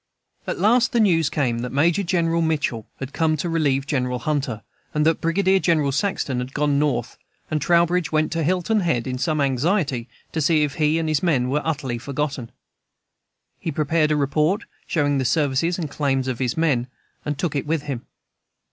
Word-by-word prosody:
At - - -2
last 235 +7 +3
the 240 - +3
news 165 -8 +3
came 125 -7 0
that 125 +1 -4
Major 165 +7 +2
General 170 -2 +1
Mitchell 150 -8 -1
had 135 +1 -6
come 160 -1 +1
to 165 - -2
relieve 145 -5 +1
General 125 -3 -1
Hunter, 130 -5 -2 0.3
and 150 0 +2
that 160 0 +2
Brigadier 190 +3 +2
General 155 -6 +2
Saxton 145 -4 -1
had 125 +2 -6
gone 145 -1 +2
North; 130 -5 -1 0.3
and 155 -1 0
Trowbridge 170 +2 +2
went 155 0 +1
to 165 - -1
Hilton 185 +6 +1
Head 160 - 0
in 130 -1 -3
some 155 +1 0
anxiety 140 - 0 0.2
to 160 - -2
see 155 +1 +3
if 145 -2 -1
he 155 0 +2
and 165 -1 -1
his 155 -2 +1
men 135 -8 +1
were 150 +3 +1
utterly 140 -7 -2
forgotten. 135 -2 -3 1.1
He 165 - -3
prepared 155 +1 +1
a 155 - +2
report, 150 +6 +1 0.2
showing 145 -3 +1
the - - 0
services 145 +6 +1
and 170 -4 -3
claims 135 -2 -1
of 130 -3 -3
his 125 0 -1
men, 140 -7 +1 0.4
and 145 -1 -3
took 160 0 -2
it 140 - -2
with 160 -1 0
him. 135 -5 -5
150 Hz, 190 wpm, -22 LUFS, 135-165 Hz, 1.1 s, last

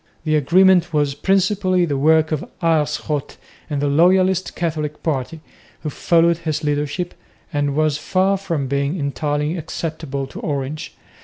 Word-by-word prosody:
The 155 -1 +1
agreement 175 +4 +4
was 145 -2 +2
principally 185 +2 +2
the 145 -4 -2
work 160 +3 +3
of 155 - -1 0.2
Aerschot 150 -3 -1 0.3
and 145 -1 -2
the - - +2
loyalist 185 +5 +3
Catholic 155 -3 -3
party, 155 +1 -2 0.4
who 150 - -4
followed 170 +2 +2
his 155 -2 -3
leadership, 150 +4 -1 0.4
and 145 -1 0
was 155 -1 +1
far 190 +4 +1
from 170 -8 -2
being 140 +5 -1
entirely 150 +2 -1
acceptable 155 -4 -4
to 135 - -10
Orange. 145 +2 -4
155 Hz, 140 wpm, -20 LUFS, 145-175 Hz, 0.4 s, agreement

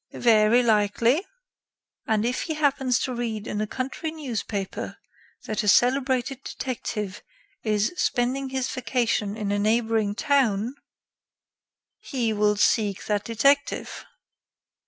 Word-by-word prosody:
"Very 230 +1 +4
likely." 230 - +2 0.8
"And 220 -1 +1
if 245 +1 -1
he 315 - -3
happens 275 -4 +2
to 260 - -2
read 225 -3 -3
in 210 - -3
a 215 - -1
country 265 +7 -4
newspaper 230 -10 -4 0.5
that 215 - -1
a 210 - -4
celebrated 255 +3 +2
detective 210 -6 -4 0.4
is 215 - 0
spending 260 0 0
his 265 -1 -1
vacation 235 -5 -1
in 205 -2 -2
a 205 - +1
neighboring 220 -1 +1
town 245 -4 +1 0.6
" - - -66
"He 235 -4 +1
will 210 0 +2
seek 205 -1 +1
that 210 -1 0
detective." 275 +6 +1
235 Hz, 120 wpm, -25 LUFS, 210-260 Hz, 0.8 s, Very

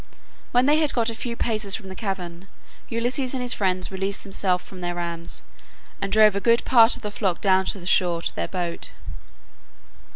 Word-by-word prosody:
When 245 +1 +4
they 295 +2 +5
had 305 -2 +1
got 230 -1 +2
a - - -5
few 235 +1 -4
paces 215 -4 0
from 195 - -8
the 190 - -7
cavern, 185 -3 -5 0.4
Ulysses 250 +3 -1
and 255 - -2
his 245 - +2
friends 185 -2 0
released 195 +1 -2
themselves 190 -2 0
from 185 -1 -11
their 175 0 -3
rams, 170 -1 -5 0.6
and 195 - -2
drove 215 -2 +6
a - - +1
good 235 +1 +3
part 230 -2 +6
of 245 - -12
the 210 - -3
flock 190 -4 -1
down 190 -1 +3
to 195 - -1
the 175 - -11
shore 175 -2 +2
to - - -2
their - - -2
boat. 175 -2 -3
195 Hz, 200 wpm, -24 LUFS, 185-230 Hz, 0.6 s, drove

